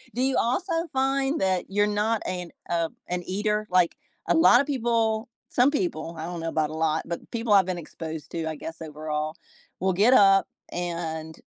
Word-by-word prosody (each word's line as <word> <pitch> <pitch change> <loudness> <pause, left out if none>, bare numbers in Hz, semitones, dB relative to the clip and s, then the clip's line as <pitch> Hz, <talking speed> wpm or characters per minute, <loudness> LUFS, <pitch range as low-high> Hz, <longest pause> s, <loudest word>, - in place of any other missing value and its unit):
Do 250 - 0
you 265 0 +2
also 335 +10 0 0.2
find 270 +2 +1
that 185 -1 +1
you're 205 +1 +2
not 210 +2 0
an, 180 -2 -4 0.2
uh 165 -1 +1 0.2
an 180 0 -2
eater? 210 +3 -1
Like, 180 -2 +3 0.3
a - - +4
lotta 280 -5 +6
people 230 -4 0 0.2
some 250 +2 +4
people, 170 - -2
I 160 - -4
don't 175 0 -5
know 165 0 -2
about 155 -1 0
a - - -6
lot, 160 0 +1
but 170 0 -6
people 230 -2 0
I've 195 -2 +6
been 185 -1 -2
exposed 160 -1 -7
to, 165 -1 -3
I 155 - -4
guess 160 +3 -8
overall, 155 0 -4 0.4
will 190 0 +1
get 210 +7 +4
up 195 -5 +6 0.2
and 165 -2 -4
185 Hz, 185 wpm, -26 LUFS, 165-230 Hz, 0.4 s, lotta